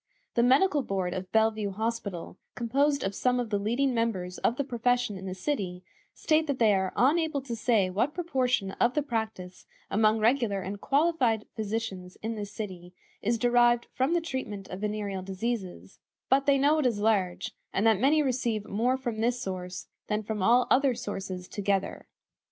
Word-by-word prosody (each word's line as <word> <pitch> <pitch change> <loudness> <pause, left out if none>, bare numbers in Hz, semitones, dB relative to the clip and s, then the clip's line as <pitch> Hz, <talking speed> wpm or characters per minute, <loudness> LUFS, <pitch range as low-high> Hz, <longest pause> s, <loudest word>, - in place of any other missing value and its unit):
The 235 - +3
Medical 285 +6 +4
Board 190 -6 -2
of 185 -1 -5
Bellevue 220 -2 +2
Hospital, 200 -4 -4 0.2
composed 280 +4 +1
of 195 - -1
some 250 +4 +1
of 235 -3 -3
the 205 - +1
leading 245 +6 +1
members 195 -6 -1
of 230 - +1
the 280 - -1
profession 245 -3 0
in 190 0 -7
the 185 - -4
city, 185 -4 -3 0.3
state 315 0 +1
that 280 -2 -1
they 220 -4 +4
"are 190 -1 0
unable 310 +3 +2
to 240 -3 -4
say 225 -4 +2
what 240 +11 0
proportion 260 - 0
of 240 +1 +3
the 300 - +1
practice 220 -8 -4 0.2
among 215 +1 +3
regular 225 -2 +2
and 200 +2 -6
qualified 275 -7 +2
physicians 205 -4 -4
in 225 +1 -2
this 205 -2 -6
city 180 -5 -7 0.3
is 230 +3 +1
derived 240 0 +3
from 265 +7 +1
the 345 - +2
treatment 235 -10 -5
of 185 +2 -6
venereal 205 -2 -2
diseases, 190 - -4 0.3
but 275 +2 +3
they 280 -1 +5
know 290 +3 +3
it 280 - +3
is 230 -4 0
large, 190 -4 +1 0.2
and 200 - 0
that 220 -3 +4
many 300 +5 +4
receive 240 -5 -1
more 245 +5 +1
from 240 -4 -4
this 240 +2 +1
source 180 -2 -5 0.2
than 210 0 -1
from 215 -1 -3
all 240 +6 +5
other 265 -1 +4
sources 195 -6 -5
together." 200 -1 -2
225 Hz, 180 wpm, -28 LUFS, 195-255 Hz, 0.3 s, they